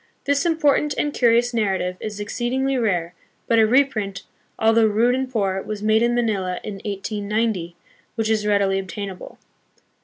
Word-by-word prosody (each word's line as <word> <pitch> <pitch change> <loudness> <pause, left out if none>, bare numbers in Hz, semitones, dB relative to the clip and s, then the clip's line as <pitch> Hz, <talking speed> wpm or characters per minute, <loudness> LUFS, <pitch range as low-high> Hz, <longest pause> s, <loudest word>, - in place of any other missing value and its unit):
This 285 +4 +1
important 300 -2 +2
and 295 -1 -1
curious 240 0 +3
narrative 190 -5 0
is 210 -1 -6
exceed 240 +4 -3
ingly 265 -1 0
rare, 175 -6 0 0.3
but 230 - +3
a 220 - +5
reprint, 215 -6 +1 0.3
although 225 0 +4
rude 225 +4 +2
and 260 0 -2
poor, 195 -5 0
was 210 0 -6
made 215 +1 +3
in 240 0 +2
Manila 200 -6 -1
in 205 -2 -6
1890, 205 -2 -2 0.4
which 225 -1 -1
is 215 -1 0
readily 200 -2 +2
obtainable. 195 0 -7
215 Hz, 155 wpm, -22 LUFS, 200-240 Hz, 0.4 s, a